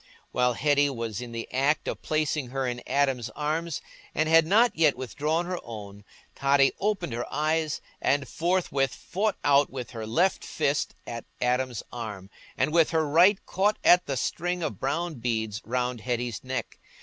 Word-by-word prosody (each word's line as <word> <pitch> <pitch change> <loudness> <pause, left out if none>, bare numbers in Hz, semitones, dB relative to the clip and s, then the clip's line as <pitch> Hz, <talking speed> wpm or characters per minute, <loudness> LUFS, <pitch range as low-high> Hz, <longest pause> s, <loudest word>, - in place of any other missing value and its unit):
While 125 0 +2
Hetty 145 +2 +3
was 115 -4 -4
in 120 -1 -7
the 115 0 -5
act 140 +4 +1
of - - -3
placing 155 -3 0
her 135 +1 -2
in 120 -1 -3
Adam's 135 -3 +1
arms, 155 +2 -2 0.3
and 155 +1 +2
had 165 0 +5
not 225 +6 +4
yet 160 -1 +3
withdrawn 150 +6 -1
her 180 0 -3
own, 105 -3 -9 0.3
Totty 140 0 +4
opened 195 - -1
her 120 +1 -4
eyes, 155 0 0 0.2
and 140 -1 +1
forthwith 160 -5 0
fought 205 +3 -1
out 140 0 +4
with 125 -3 -6
her 110 -2 -6
left 175 +12 +2
fist 145 +1 -1
at 115 -1 -6
Adam's 125 -2 0
arm, 105 -5 -7 0.3
and 150 - +1
with 165 -2 +5
her 160 -2 +1
right 180 +7 +5
caught 205 +3 +1
at 180 0 +6
the 135 - -1
string 175 +7 -1
of 110 - -3
brown 155 +2 -2
beads 110 -3 -2
round 125 0 -1
Hetty's 120 -1 -2
neck. 130 0 -4
140 Hz, 170 wpm, -27 LUFS, 120-160 Hz, 0.3 s, at